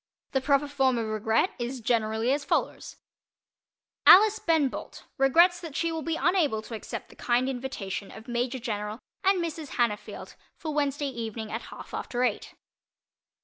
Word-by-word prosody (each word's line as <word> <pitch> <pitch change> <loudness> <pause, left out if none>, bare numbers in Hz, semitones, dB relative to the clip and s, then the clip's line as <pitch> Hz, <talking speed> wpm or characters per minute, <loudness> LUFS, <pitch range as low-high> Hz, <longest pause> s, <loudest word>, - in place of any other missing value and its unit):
The 265 - +1
proper 280 +1 +2
form 270 -3 +2
of 230 - -1
"regret" 220 - +1
is 245 +2 -3
generally 225 +1 +1
as 285 0 -1
follows: - - -1 1.1
Alice 430 +3 +8
Ben 320 -6 +3
Bolt - - -8
regrets 340 +7 +5
that 325 -5 -8
she 335 0 0
will 325 -1 -3
be 325 +1 -2
unable 300 - +1
to 230 - -9
accept 220 - -6
the - - -16
kind 245 +1 +1
invitation 245 -7 -4
of 220 +2 -12
Major 245 +2 -1
General 210 -3 -4 0.3
and 390 0 +4
Mrs. 320 -3 -5
Hannafield 230 -4 -2 0.2
for 310 -2 -4
Wednesday 285 -1 0
evening 225 -3 -5
at 225 - -3
half - - -11
after 245 0 -2
eight. 250 - -2
260 Hz, 160 wpm, -27 LUFS, 225-300 Hz, 1.1 s, Alice